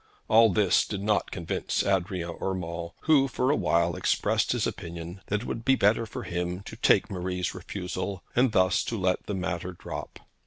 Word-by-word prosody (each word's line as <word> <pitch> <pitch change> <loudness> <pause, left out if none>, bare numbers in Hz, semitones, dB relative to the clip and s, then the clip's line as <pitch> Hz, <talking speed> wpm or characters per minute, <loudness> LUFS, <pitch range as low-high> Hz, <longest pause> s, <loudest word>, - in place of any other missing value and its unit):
All 115 +1 +6
this 95 -1 +3
did 100 -2 -4
not 105 0 +1
convince 85 -3 -2
Adrian 90 -3 -1
Urmand, 85 -3 -3
who 145 -4 +4
for 130 0 +1
a - - +3
while 85 - +2
expressed - - +1
his - - +1
opinion 85 +2 -6
that 105 +1 0
it - - -7
would 115 - -4
be 135 +3 +4
better 110 0 +2
for - - -6
him 90 +1 -3
to - - -9
take - - +3
Marie's 90 -1 -2
refusal, 90 0 -5
and 125 0 +4
thus 95 -3 +3
to 115 - -2
let 90 -2 0
the 105 - -2
matter 90 -1 -3
drop. - - -7
95 Hz, 185 wpm, -27 LUFS, 90-105 Hz, -, All